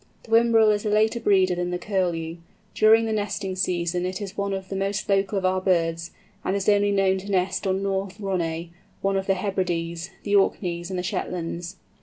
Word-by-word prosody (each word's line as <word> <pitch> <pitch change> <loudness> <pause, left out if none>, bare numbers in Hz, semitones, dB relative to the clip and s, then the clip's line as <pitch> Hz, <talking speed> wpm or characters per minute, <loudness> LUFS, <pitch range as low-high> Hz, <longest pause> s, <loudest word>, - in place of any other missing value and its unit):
The 225 - -15
Whimbrel 225 -1 +5
is 205 -1 0
a 215 - -1
later 220 +3 +2
breeder 190 -4 +3
than 175 0 -2
the 180 - -1
Curlew. 175 -4 -2 0.4
During 220 +1 +5
the 220 - -1
nesting 205 -2 -2
season 175 -1 -1
it 185 +1 -3
is 200 -1 -6
one 200 -1 -2
of 190 -1 -4
the 195 - -4
most 195 +1 -2
local 195 0 +1
of 190 - -1
our 185 0 +1
birds, 165 -3 0 0.3
and 190 - 0
is 200 -1 -2
only 205 -1 +4
known 190 -1 +2
to 200 +2 -9
nest 190 0 0
on 190 +1 0
North 195 -1 -2
Ronay—one 175 0 -3
of 190 0 -1
the 195 - +3
Hebrides—the 180 0 -2
Orkneys, 175 -3 +1
and 185 - -3
the 180 - -2
Shetlands. 175 -2 -4
190 Hz, 195 wpm, -24 LUFS, 180-200 Hz, 0.4 s, Whimbrel